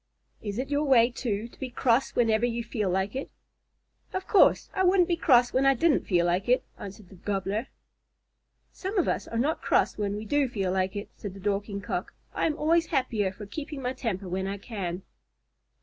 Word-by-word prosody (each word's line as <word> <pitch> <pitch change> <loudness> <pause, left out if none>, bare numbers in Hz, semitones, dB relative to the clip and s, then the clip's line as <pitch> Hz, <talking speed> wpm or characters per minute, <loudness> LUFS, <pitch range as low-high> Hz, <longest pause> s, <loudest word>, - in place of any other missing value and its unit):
"Is 205 -1 -4
it 270 +3 -3
your 290 +1 +2
way, 250 -3 +5
too, 225 -3 -3
to - - -20
be 260 - -4
cross 245 +1 +1
whenever 225 -2 +3
you 235 -1 0
feel 215 -4 -2
like 190 +4 -1
it?" 270 - -4 0.8
"Of 375 0 -3
course. 405 - +4
I 380 - +1
wouldn't 365 -1 +4
be 345 - +2
cross 245 -7 +4
when 260 - +3
I 275 0 +5
didn't 310 +3 +2
feel 175 -3 +3
like 180 +6 0
it," 250 - +4 0.2
answered 200 -1 -9
the - - -14
Gobbler. 200 +4 -2 1.0
"Some 395 +3 -5
of 360 - +2
us - - -1
are 230 - -4
not 285 +7 0
cross - - +1
when 205 -1 -1
we 210 +1 -5
do 280 +4 +1
feel 195 -5 -1
like 190 +1 0
it," 205 +1 -5
said 200 -2 -7
the - - -10
Dorking 200 +1 -2
Cock. - - -4 0.2
"I - - +1
am 310 -1 -2
always 330 +2 +2
happier 215 -7 0
for 205 +2 -9
keeping 280 +5 -6
my 250 +1 -1
temper 200 -7 -3
when 190 +2 -2
I 200 +1 -3
can." 190 -4 -5
230 Hz, 210 wpm, -27 LUFS, 200-270 Hz, 1.0 s, way